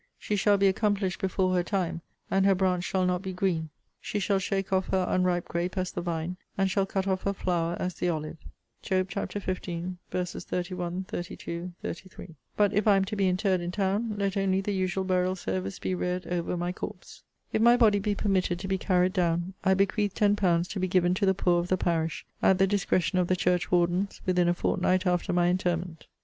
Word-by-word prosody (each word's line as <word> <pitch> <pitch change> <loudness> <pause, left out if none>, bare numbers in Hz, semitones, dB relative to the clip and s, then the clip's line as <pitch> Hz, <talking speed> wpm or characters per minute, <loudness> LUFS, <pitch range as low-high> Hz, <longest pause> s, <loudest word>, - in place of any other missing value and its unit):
She 210 - -2
shall 205 0 +3
be 200 - +3
accomplished 195 -1 +1
before 185 -1 +1
her 180 - +3
time; 175 -2 -2 0.3
and 195 0 +3
her 195 - +5
branch 180 -1 +1
shall 185 -1 0
not 180 0 0
be 190 -1 -5
green. 180 -4 -1 0.3
She - - -4
shall 200 -1 +1
shake 195 0 -2
off 190 0 +1
her 185 -1 +1
unripe 180 -1 +1
grape 175 +3 -2
as 185 -1 -1
the - - -4
vine, 170 +1 -3 0.2
and 195 -1 +2
shall 195 0 +1
cut 195 -1 -1
off 190 -1 0
her 200 - -1
flower 175 -3 -1
as 185 0 -2
the 175 - -1
olive.'* 155 -1 -4 0.3
* - - -47
Job 185 0 0
xv. 200 +1 -4 1.1
31, 180 0 -3
32, 175 0 -5
33. 185 +1 -7 0.3
But 205 -1 +3
if 210 +1 +1
I 205 - +7
am 195 - +2
to 210 +2 -4
be 195 -2 +2
interred 185 0 +1
in 175 - -3
town, 205 +3 0
let 200 -1 -1
only 195 -1 +1
the 200 +1 -2
usual 190 0 0
burial 185 0 +1
service 95 - -3
be - - -2
read 180 0 -2
over 175 0 -2
my 175 +1 -1
corpse. 185 - -8 0.3
If - - +2
my 235 +1 +6
body 215 -4 +5
be 205 +1 -1
permitted 190 -4 +1
to 190 - -4
be 190 0 0
carried 185 -1 +2
down, 175 0 0
I 190 -1 +4
bequeath 200 +1 +1
ten 205 -1 +3
pounds 175 -4 +2
to 200 - -4
be 185 - 0
given 180 -1 +3
to 195 +2 +1
the 190 - +3
poor 175 -2 +2
of 175 - -2
the 185 - +1
parish, 165 -3 -1 0.2
at 190 - +4
the 190 - +4
discretion 190 -2 +1
of 180 - +1
the 185 - +2
church 180 0 +1
wardens, 180 +2 +1
within 180 -1 +2
a 175 - +2
fortnight 185 +2 +1
after 180 -1 +1
my 175 0 +3
interment. 175 -2 -2
185 Hz, 215 wpm, -28 LUFS, 175-195 Hz, 1.1 s, I